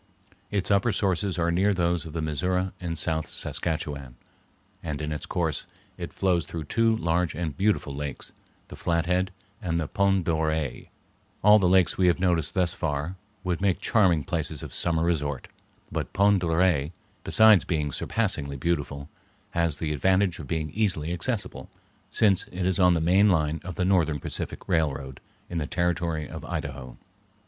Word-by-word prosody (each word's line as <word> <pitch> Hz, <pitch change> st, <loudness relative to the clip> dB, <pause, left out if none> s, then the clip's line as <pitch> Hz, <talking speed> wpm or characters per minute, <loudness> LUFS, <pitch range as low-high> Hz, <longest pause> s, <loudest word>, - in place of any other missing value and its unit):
Its 100 Hz, -1 st, -1 dB
upper 100 Hz, +4 st, +3 dB
sources 95 Hz, -1 st, 0 dB
are 85 Hz, 0 st, +1 dB
near 95 Hz, +4 st, +2 dB
those 85 Hz, -1 st, 0 dB
of 80 Hz, -, -9 dB
the 80 Hz, -1 st, -2 dB
Missouri 90 Hz, +5 st, 0 dB
and 85 Hz, -2 st, -3 dB
South 80 Hz, -1 st, 0 dB
Saskatchewan, 70 Hz, -6 st, -3 dB, 0.7 s
and 75 Hz, -3 st, -4 dB
in 75 Hz, 0 st, -3 dB
its 75 Hz, -, -4 dB
course 80 Hz, -4 st, -2 dB, 0.3 s
it -, -, -6 dB
flows 90 Hz, -3 st, +1 dB
through 80 Hz, -2 st, -5 dB
two 115 Hz, +7 st, +2 dB
large 85 Hz, 0 st, 0 dB
and 80 Hz, -4 st, -3 dB
beautiful 100 Hz, -8 st, +1 dB
lakes, 70 Hz, -1 st, -6 dB, 0.4 s
the -, -, -8 dB
Flathead 90 Hz, +2 st, 0 dB, 0.3 s
and 85 Hz, -4 st, -1 dB
the 80 Hz, -, -2 dB
Pend 95 Hz, -1 st, +1 dB
d'Oreille. 80 Hz, -4 st, -1 dB, 0.6 s
All 105 Hz, +1 st, +8 dB
the 90 Hz, -3 st, +3 dB
lakes 95 Hz, 0 st, +3 dB
we 90 Hz, -, +4 dB
have 90 Hz, 0 st, +3 dB
noticed 85 Hz, -3 st, +1 dB
thus 90 Hz, -2 st, +1 dB
far 75 Hz, +2 st, -2 dB, 0.3 s
would 90 Hz, 0 st, -1 dB
make 100 Hz, -3 st, +2 dB
charming 95 Hz, -, +3 dB
places 80 Hz, -4 st, -3 dB
of -, -, -8 dB
summer 80 Hz, -2 st, +1 dB
resort; 75 Hz, -5 st, -1 dB, 0.4 s
but -, -, -3 dB
Pend 100 Hz, 0 st, +4 dB
d'Oreille, 85 Hz, -4 st, +2 dB, 0.3 s
besides 110 Hz, -3 st, +6 dB
being 75 Hz, -4 st, -1 dB
surpassingly 75 Hz, -, -1 dB
beautiful, 70 Hz, -2 st, -2 dB, 0.4 s
has 85 Hz, -5 st, 0 dB
the 75 Hz, -1 st, -2 dB
advantage 95 Hz, +4 st, +2 dB
of 75 Hz, -, -7 dB
being 80 Hz, 0 st, -2 dB
easily 85 Hz, -4 st, -1 dB
accessible, 85 Hz, -, -3 dB, 0.4 s
since 100 Hz, -4 st, +2 dB
it 90 Hz, 0 st, -4 dB
is 95 Hz, -1 st, +1 dB
on 90 Hz, -1 st, +5 dB
the 80 Hz, -, 0 dB
main 95 Hz, +5 st, +4 dB
line 80 Hz, -3 st, +1 dB
of 90 Hz, -1 st, -6 dB
the 90 Hz, -, 0 dB
Northern 85 Hz, -6 st, +2 dB
Pacific -, -, -5 dB
Railroad 70 Hz, -5 st, -1 dB, 0.3 s
in 85 Hz, -, -3 dB
the 75 Hz, -, -3 dB
Territory 85 Hz, -3 st, -1 dB
of -, -, -8 dB
Idaho. 65 Hz, -3 st, -5 dB
85 Hz, 165 wpm, -26 LUFS, 75-95 Hz, 0.7 s, All